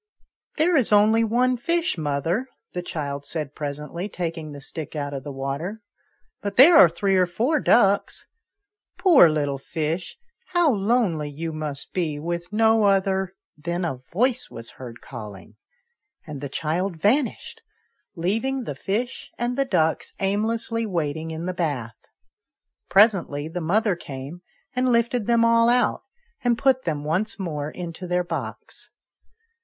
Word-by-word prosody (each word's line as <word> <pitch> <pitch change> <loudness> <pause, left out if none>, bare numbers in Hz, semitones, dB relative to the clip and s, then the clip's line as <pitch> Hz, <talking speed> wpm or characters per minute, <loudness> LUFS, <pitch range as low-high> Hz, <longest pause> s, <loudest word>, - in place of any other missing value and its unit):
" - - -43
There 335 +3 +3
is 260 -8 +3
only 215 +2 +5
one 245 +3 +2
fish, 335 +7 0
mother," 160 - -1 0.3
the 180 - -2
child 145 -5 -4
said 150 -2 -3
presently, 150 +6 -5
taking 165 -4 -4
the 145 - -8
stick 155 +3 -6
out 145 -1 -3
of 135 -2 -5
the 145 - -6
water, 140 +11 -4 0.3
" - - -45
but 200 -1 -4
there 310 +7 +8
are 175 - +9
three 195 +4 0
or 185 -1 +4
four 245 - +1
ducks. 200 -6 +3 0.7
Poor 320 - +7
little 145 -3 -1
fish! 160 +4 -3 0.4
how 350 -4 +4
lonely 195 -8 +1
you 160 +3 -5
must 150 -2 -3
be, 160 -5 -1
with 170 +3 -4
no 220 0 +4
other 190 -1 +1
" - - -71
Then 175 +2 -1
a 135 -7 -3
voice 250 +6 0
was 115 0 -9
heard 120 -2 -10
calling, 105 -2 -10 0.7
and 150 -4 -7
the 140 - -4
child 165 +5 -2
vanished, 245 - 0 0.5
leaving 225 +10 -1
the 145 - -4
fish 210 - -3
and 240 +1 -1
the 275 +1 +1
ducks 160 -11 0
aimlessly 225 +3 0
waiting 160 -3 -2
in 160 +1 -5
the 185 - -2
bath. 135 -10 -4 0.8
Presently 185 -8 +3
the 175 +2 -5
mother 200 +4 +2
came, 140 +1 -8 0.3
and 255 0 +2
lifted 235 -1 +1
them 235 -1 +4
all 230 0 +4
out, 245 +1 +2 0.4
and 240 -2 +2
put 260 0 +2
them 150 -3 -2
once 175 +8 -1
more 155 -6 -3
into 175 +2 -7
their 180 0 +1
box. 175 - -6
180 Hz, 155 wpm, -24 LUFS, 150-225 Hz, 0.8 s, are